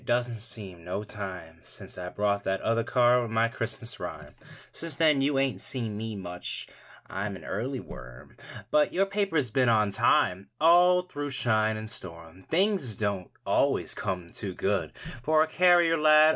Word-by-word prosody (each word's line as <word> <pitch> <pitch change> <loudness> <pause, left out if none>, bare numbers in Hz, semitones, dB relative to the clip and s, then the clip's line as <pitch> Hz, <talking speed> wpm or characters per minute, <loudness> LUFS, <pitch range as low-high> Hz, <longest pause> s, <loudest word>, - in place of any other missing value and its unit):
Doesn't 120 -2 0
seem 100 -6 -3
no 90 +4 -4
time 95 -6 -7
Since - - -7
I 90 0 -5
brought 100 +1 0
that 95 0 0
other 115 +1 +1
card 125 +1 +4
With 120 - -4
my 115 +1 +2
Christmas - - -4
rhyme. - - -7 0.4
Since 165 -4 -3
then 155 -4 +4
you 140 0 +1
ain't 135 -1 0
seen 115 -5 -3
me 110 +1 -4
much; 90 -2 -5 0.4
I'm 100 +1 -4
an 80 -4 -11
early 130 +2 -3
worm. 65 - -11 0.4
But 150 0 +3
your 195 +2 +3
paper's 195 - 0
been 130 0 +3
on 105 -3 +3
time 95 -1 +2
All 175 +3 +6
through 145 -5 -5
shine 110 -4 +1
and 110 0 -6
storm. 85 -4 -8
Things 180 - +1
don't 100 -3 -2 0.2
always - - +1
come 90 -2 -4
too 95 -3 -6
good 95 -7 -1 0.3
For 155 +3 +4
a - - -2
carrier 175 -2 +4
lad. 155 0 +7
115 Hz, 170 wpm, -28 LUFS, 100-150 Hz, 0.4 s, lad